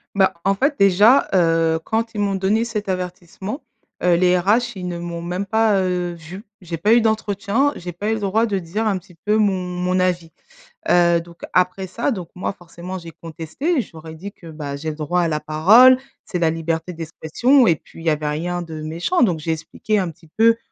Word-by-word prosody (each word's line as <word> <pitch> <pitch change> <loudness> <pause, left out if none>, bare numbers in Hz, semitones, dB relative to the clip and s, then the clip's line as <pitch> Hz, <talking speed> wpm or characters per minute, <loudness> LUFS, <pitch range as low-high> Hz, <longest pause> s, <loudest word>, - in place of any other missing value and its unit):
Bah, 190 -1 +3
en 195 0 +3
fait 280 +8 +1
déjà, 205 +7 +5
heu, 165 -2 +3
quand 225 0 -2
ils 205 - -1
m'ont 200 -1 0
donné 195 +4 +1
cet 215 -3 -4
avertissement, 185 - -5 0.4
heu, 175 -1 +4
les 180 +1 +3
RH 220 +5 +1
ils 180 -1 -5
ne 175 - -4
m'ont 170 0 -5
même 180 +3 -3
pas, 215 -1 +2
heu, 180 -1 -1
vue. 170 +5 -10 0.2
J'ai 170 -2 -5
pas 210 +7 +3
eu 235 - +5
d'entretien, 220 +4 0
j'ai 175 0 -6
pas 200 +5 -4
eu - - +2
le 220 - -3
droit 210 +3 +2
de 205 -4 -1
dire 190 +5 -2
un 200 - +1
petit 180 -1 -14
peu 210 +1 +2
mon 210 -2 +3
mon 180 0 -1
avis. 175 -3 0 0.6
Heu, 170 -1 +4
donc 170 0 -16
après 185 +1 +1
ça 235 +9 -1
donc 185 -8 -4
moi 180 - -2
forcément 175 0 -9
j'ai 170 -2 -9
contesté 165 - -3
et 260 - +3
je - - -12
leur 160 0 -12
ais 160 - -9
dit 195 +5 -8
que, 170 - -15
bah, 150 -3 -6
j'ai 155 +3 -4
le 150 - -6
droit 160 +4 0
à 170 - +1
la 150 -1 -1
parole, 215 +14 +6 0.3
c'est 180 - -3
la 165 -2 +3
liberté 165 +1 -2
d'expression 170 - +2
et 170 - +4
puis 165 - -15
il - - -10
y 165 - +3
avait 150 0 0
rien 175 +4 -2
de 160 -2 -7
méchant 170 - 0
donc 175 -8 +2
j'ai 160 +1 -1
expliqué 165 +6 -3
un 185 -4 0
petit 165 +1 -21
peu, 230 +1 +5
180 Hz, 225 wpm, -21 LUFS, 165-210 Hz, 0.6 s, parole